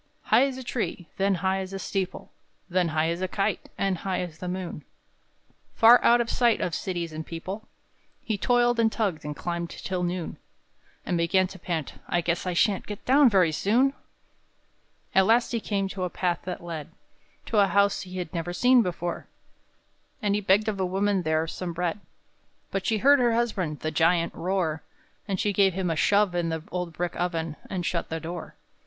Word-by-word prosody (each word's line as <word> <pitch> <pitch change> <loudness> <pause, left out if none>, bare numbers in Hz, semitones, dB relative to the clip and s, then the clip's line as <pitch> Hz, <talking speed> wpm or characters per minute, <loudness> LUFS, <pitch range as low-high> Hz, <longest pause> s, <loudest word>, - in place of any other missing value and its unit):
_" - - -42 0.3
High 270 - +6
as 265 -2 -5
a 260 - -6
tree, 215 - -3
then 195 0 +2
high 190 +1 +2
as 190 0 -6
a - - -3
steeple, 190 -1 -4 0.4
Then 180 0 +1
high 160 0 +1
as 170 +2 -2
a 185 - 0
kite, 200 +2 -2
and 195 -3 0
high 190 -2 -2
as 165 -3 -7
the 180 - -5
moon, 180 -4 -5 0.9
Far 235 +2 +7
out 240 +1 +6
of 235 - 0
sight 235 -1 +2
of 175 - -2
cities 170 -2 -3
and 155 +1 -5
people, 185 +7 -7 0.6
He 220 - -1
toiled 240 +3 +2
and 225 -1 +3
tugged 195 -10 -1
and 150 0 -5
climbed 170 +1 -3
till 185 -2 -4
noon; 175 -1 -3 0.7
And 175 - 0
began 185 +3 +3
to 190 - -11
pant: 165 -3 -4
"I 175 - +1
guess 170 +2 -1
I 180 - 0
shan't 195 +3 +1
Get 205 -1 -7
down 270 +1 +6
very 185 -6 +4
soon!" 240 - +2 1.2
At 190 0 +5
last 235 +2 +3
he 235 - 0
came 200 -3 -1
to 190 -1 -4
a 180 - -1
path 175 -1 -1
that 180 -1 -5
led 165 -3 -6 0.6
To 220 - +1
a 200 - +5
house 200 +2 +2
he 185 -1 -8
had 180 -2 -5
never 175 0 -3
seen 250 +6 +5
before; 175 -3 -3 0.9
And 205 -1 0
he 210 - +1
begged 200 +2 +3
of 205 -2 -1
a - - +1
woman 195 +1 +1
there 160 -1 +1
some 175 +1 -5
bread; 175 +4 -2 0.7
But 195 -1 -2
she 220 - +2
heard 280 +6 +5
her 240 -2 +3
husband, 195 -10 -1
the 155 - -2
Giant, 165 +2 +2
roar, 170 -4 -1 0.5
And 195 -3 -2
she 205 - +1
gave 195 -2 +3
him 185 -3 -1
a - - 0
shove 200 +3 +3
in 175 -1 0
the 160 -1 -3
old 180 -1 -3
brick 175 +2 -3
oven, 165 -3 -2
And 180 -3 -3
shut 170 0 -2
the 160 - -3
door. 170 +2 -7
185 Hz, 200 wpm, -26 LUFS, 170-205 Hz, 1.2 s, Far